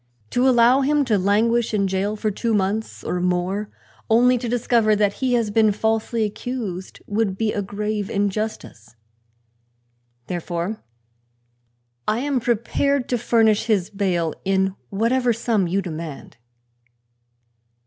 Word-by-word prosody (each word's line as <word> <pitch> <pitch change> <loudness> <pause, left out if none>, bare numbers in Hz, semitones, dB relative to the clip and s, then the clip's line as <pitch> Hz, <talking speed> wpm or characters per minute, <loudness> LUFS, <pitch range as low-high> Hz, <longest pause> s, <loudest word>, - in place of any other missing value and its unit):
To 250 +2 +3
allow 245 +2 +5
him 290 +1 +2
to 220 -5 +2
languish 220 +4 +2
in 200 -1 +1
jail 190 +3 -1
for 215 0 -1
two 225 +2 -1
months 205 +3 -2
or 180 - -2
more, 180 +3 -1 0.4
only 245 +2 +4
to 240 -1 -4
discover 230 -2 +2
that 205 -1 +2
he 255 -1 +1
has 230 -3 +1
been 215 0 +4
falsely 220 +2 0
accused, 210 -4 -5
would 205 -2 -1
be 220 0 0
a 205 - -1
grave 205 +1 -3
injustice. 200 - -3 1.3
Therefore 175 - -4 1.3
I 215 - +2
am 275 +1 0
prepared 245 +3 0
to 245 - +1
furnish 220 -2 +3
his 210 -4 0
bail 180 -6 0
in 190 0 +1 0.2
whatever 240 +4 +1
sum 220 -4 0
you 190 +3 0
demand." 160 -7 -7
215 Hz, 130 wpm, -22 LUFS, 195-235 Hz, 1.3 s, allow